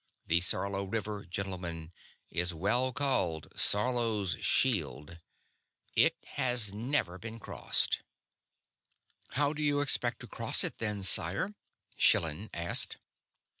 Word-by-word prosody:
The 85 +1 +2
Sarlo 100 +2 +2
River, 105 0 -5
gentlemen, 90 -3 -6 0.4
is 90 0 0
well 120 +10 0
called 110 - -1
'Sarlo's 110 -4 +1
Shield.' 80 - 0 0.8
It - - +3
has 120 -5 +1
never 110 -5 -3
been 115 0 -9
crossed." - - +1 1.3
"How 145 +2 0
do 155 - -6
you 145 -1 +1
expect 130 -4 0
to - - -10
cross - - +2
it, - - 0
then, 105 -3 -2
sire?" 100 - +5 0.4
Schillan 80 +6 +2
asked. 85 0 -1
100 Hz, 110 wpm, -29 LUFS, 85-125 Hz, 1.3 s, sire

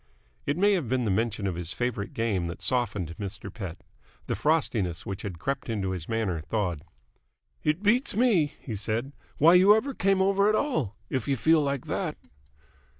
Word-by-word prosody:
It 145 - 0
may 205 +3 +4
have 165 - -1
been 130 0 +1
the 110 - 0
mention 105 0 0
of 95 - 0
his 85 0 -2
favourite 120 -5 -3
game 105 -7 0
that 85 - -6
softened 105 -10 0
Mr. 100 -1 -6
Pett. 95 -7 -7 0.4
The - - -2
frostiness 110 - 0
which 95 -1 -5
had 95 -5 -5
crept 135 +8 -3
into 100 -4 -1
his 90 -4 -5
manner 110 -8 -1
thawed. 90 -4 -2 0.8
"It 155 +6 0
beats 235 +3 +3
me," 205 -11 +3
he 115 - -6
said, 110 +6 -2 0.3
"why 165 +4 +6
you 190 +3 +7
ever 270 +6 -1
came 195 -4 +2
over 200 +1 +3
at 215 - +3
all, 155 - -1 0.2
if 130 -4 -1
you 140 -1 +1
feel 160 +4 +4
like 140 -2 -2
that." - - -2
120 Hz, 185 wpm, -27 LUFS, -, 0.8 s, you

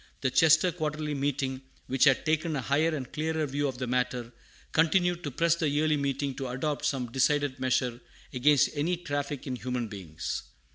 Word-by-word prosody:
The 130 - +1
Chester 160 +5 +5
Quarterly 155 -2 -3
Meeting, 135 -1 -1 0.2
which 130 +1 +3
had 135 +1 +4
taken 155 0 +1
a 135 - -1
higher 155 +5 +1
and 130 -4 -6
clearer 160 0 -1
view 145 +1 -1
of 130 -2 -4
the 125 - -3
matter, 125 -1 -1 0.4
continued 175 +2 +2
to 145 - -2
press 165 +5 +2
the 165 -3 0
Yearly 150 +2 +2
Meeting 140 -1 -1
to 135 -2 -3
adopt 145 +4 -2
some 130 -5 -1
decided 140 +1 +1
measure 125 -1 0 0.3
against 140 +2 +4
any 160 +4 0
traffic 145 -3 -4
in 130 -3 -3
human 125 +1 -3
beings. 90 -5 -5
145 Hz, 180 wpm, -28 LUFS, 130-155 Hz, 0.4 s, Chester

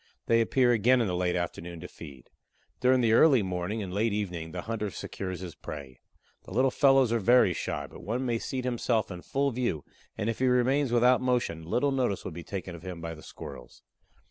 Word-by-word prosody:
They 115 0 +4
appear 125 +2 +3
again 120 +3 +4
in 115 - +2
the 90 -3 -1
late 90 0 0
afternoon 85 -1 -4
to 90 - -7
feed. 70 -9 -12 0.5
During 130 0 +4
the 115 -2 +3
early 130 -2 +6
morning 95 +4 -3
and 90 -2 -6
late 105 +2 +1
evening 90 -6 -3
the 90 0 -5
hunter 110 -2 -3
secures 95 -1 -6
his 90 -3 -6
prey. 70 -4 -9 0.5
The - - -12
little 130 +2 +2
fellows 135 -4 +4
are 115 - +2
very 115 -2 +5
shy, - - -3
but - - -12
one 120 +7 -2
may 120 -2 0
seat 130 +1 -4
himself 120 -3 0
in 90 -1 -7
full 140 +6 0
view 120 - -2 0.3
and 110 -1 -2
if 115 - -2
he 130 - +2
remains 130 +2 +2
without 125 +1 +4
motion 125 -10 0
little 125 - 0
notice 125 -7 -1
will - - -4
be 85 +2 -7
taken 95 -1 -6
of 85 - -9
him 90 -1 -7
by 85 0 -5
the 80 - -12
Squirrels. 60 - -11
110 Hz, 215 wpm, -28 LUFS, 90-125 Hz, 0.5 s, early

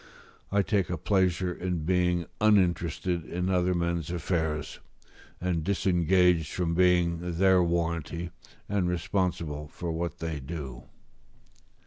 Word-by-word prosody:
I 100 0 +3
take 100 -2 0
a 90 - -2
pleasure 90 0 +1
in 90 -3 -3
being 90 -1 +1
uninterested 90 -4 +2
in 90 +3 -2
other 90 0 +2
men's 85 -2 -1
affairs, 80 -3 -2 0.6
and 85 -3 -1
disengaged 90 -3 +2
from 85 -2 -1
being 90 -1 +3 0.2
their 95 0 +5
warranty, 85 0 -1 0.4
and 100 -3 0
responsible 85 -4 -2
for 85 +2 -5
what 85 -1 -3
they 80 -2 -4
do. 65 -4 -7
85 Hz, 115 wpm, -28 LUFS, 85-90 Hz, 0.6 s, their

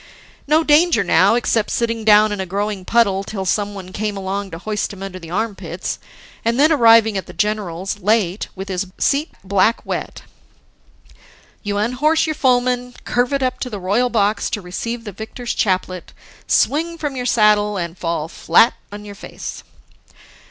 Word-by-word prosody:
No 310 +2 +4
danger 305 - +4
now, 185 +4 +4
except 230 -2 +1
sitting 230 -1 -1
down 215 0 +5
in 205 - -3
a 190 - -4
growing 200 0 -3
puddle 200 -4 +2
till 195 -1 -5
someone 200 -1 -2
came 210 -1 -3
along 195 +1 -3
to 165 - -7
hoist 210 +4 -3
him 195 -1 -9
under 190 -1 -7
the 165 -2 -11
armpits, 205 +3 -4 0.4
and 235 +3 0
then 305 +3 +5
arriving 230 -6 +5
at - - -10
the - - -10
general's 205 -2 -2
late, 205 -1 +1
with 190 +1 -6
his 190 0 -3
seat 290 +3 +1
black 200 +4 +1
wet.... - - -5 1.4
You 205 0 -3
unhorse 255 +9 +2
your 315 - -1
foeman, 250 -2 +1
curvet 250 +3 0
up 255 - -1
to 250 - -4
the 210 -4 -6
royal 205 +7 +1
box 210 -2 +1
to - - -2
receive 230 +6 -5
the 210 - -7
victor's 220 +4 -6
chaplet, 185 -2 -1 0.3
swing 330 +4 +1
from 295 -4 -4
your 250 -1 -3
saddle, 210 -3 +3
and 170 -2 -4
fall 165 -3 -3
flat 170 +7 +3 0.2
on 205 0 -8
your 205 - -8
face. 200 - -8
210 Hz, 165 wpm, -19 LUFS, 195-245 Hz, 1.4 s, down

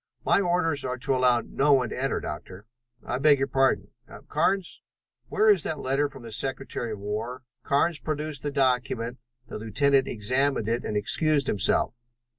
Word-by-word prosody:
"My - - +4
orders 175 -5 +1
are 125 - -3
to 130 +2 -1
allow 125 -2 +3
no 145 +1 +2
one 125 -4 +2
to - - -5
enter, 135 - 0
Doctor." 90 +6 -8 0.4
"I 125 - -2
beg 145 0 +5
your 135 - 0
pardon. 135 -1 +1 0.4
Carnes, 195 -2 0 0.5
where 220 - +1
is 195 -5 +3
that 155 - -3
letter 140 +2 0
from 135 -3 -12
the 115 - -9
Secretary 130 -1 -3
of - - -6
War?" 110 +5 -5 0.2
Carnes 150 +3 +1
produced 155 -2 -3
the 145 - -2
document. 125 -3 0 0.3
The - - -7
lieutenant 135 +5 +2
examined 130 +2 0
it 115 +2 -1
and 105 - -2
excused 145 +7 +3
himself. 110 +2 +1
135 Hz, 170 wpm, -26 LUFS, 120-145 Hz, 0.5 s, beg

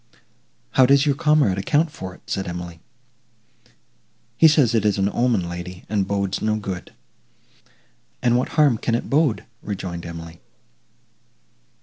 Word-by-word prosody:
"How 130 -1 +5
does 140 +1 +4
your 145 - +3
comrade 145 - +2
account 150 +10 +1
for 95 -7 -8
it?" - - -20
said 95 -1 -3
Emily. 85 -1 -6 1.6
"He 160 - +6
says 145 -7 +4
it 110 -3 +2
is 105 -2 +1
an 100 +1 +1
omen, 120 -7 +1
lady, 90 +1 -7
and 100 -2 0
bodes 100 -1 -1
no 110 0 +1
good." 95 -4 -6 1.3
"And 120 -1 +2
what 125 - 0
harm 140 -7 +4
can 115 - 0
it 120 - -4
bode?" 145 -5 +2 0.2
rejoined 90 -4 -5
Emily. 85 -1 -9
105 Hz, 140 wpm, -22 LUFS, 90-130 Hz, 1.6 s, He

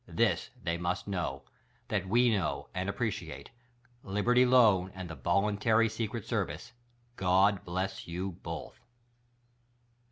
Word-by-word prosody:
This - - +1
they 85 0 -1
must 85 +3 -2
know: 85 -9 -3 0.5
That 95 -3 -1
we 120 +3 +4
know, 100 -4 -1
and 90 +2 -2
appreciate. 100 -8 -4 0.5
Libertv 120 +6 +3
Loan 105 -8 +5
and 95 -1 -6
the 80 - -7
Voluntary 105 +6 +2
Secret 110 -1 -4
Service 90 - -3 0.2
— 120 0 -37
God 95 +2 +4
Bless 95 +2 -3
You 90 +3 -3
Both 85 -1 -7
95 Hz, 125 wpm, -31 LUFS, 90-115 Hz, 0.5 s, Loan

